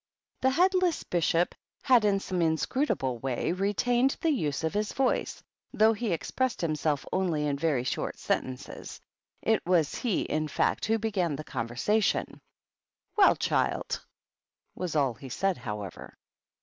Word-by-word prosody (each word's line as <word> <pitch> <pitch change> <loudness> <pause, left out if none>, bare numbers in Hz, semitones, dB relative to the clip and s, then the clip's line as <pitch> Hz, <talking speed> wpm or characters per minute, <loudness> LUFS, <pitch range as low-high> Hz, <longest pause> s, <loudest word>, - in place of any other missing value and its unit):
The 260 - +4
headless 365 +3 +2
Bishop 175 0 +1 0.3
had 250 -5 +5
in 200 -1 +3
some 185 -2 -2
inscrutable 160 - 0
way 130 +5 -1
retained 240 +8 +1
the 325 - +2
use 155 - -1
of 160 - 0
his 210 +1 -1
voice, 265 -1 0 0.3
though 220 +1 +5
he 225 -1 -2
ex 165 - -3
pressed 260 -2 0
himself 155 -3 0
only 170 -6 +1
in 145 -1 0
very 140 -4 0
short 130 - -2
sentences. 130 -1 -4 0.4
It 220 0 +2
was 170 -4 +2
he, 230 -7 0
in 155 0 -1
fact, - - 0
who 225 +1 +2
began 195 -8 -1
the 155 - -6
conversation. 130 - -1 0.7
"Well, 405 -2 +6
child!" - - -1 0.7
was 180 -3 -4
all 140 -5 +2
he 130 +4 -11
said, 195 +8 0
however. 105 -5 -7
180 Hz, 145 wpm, -28 LUFS, 150-225 Hz, 0.7 s, Well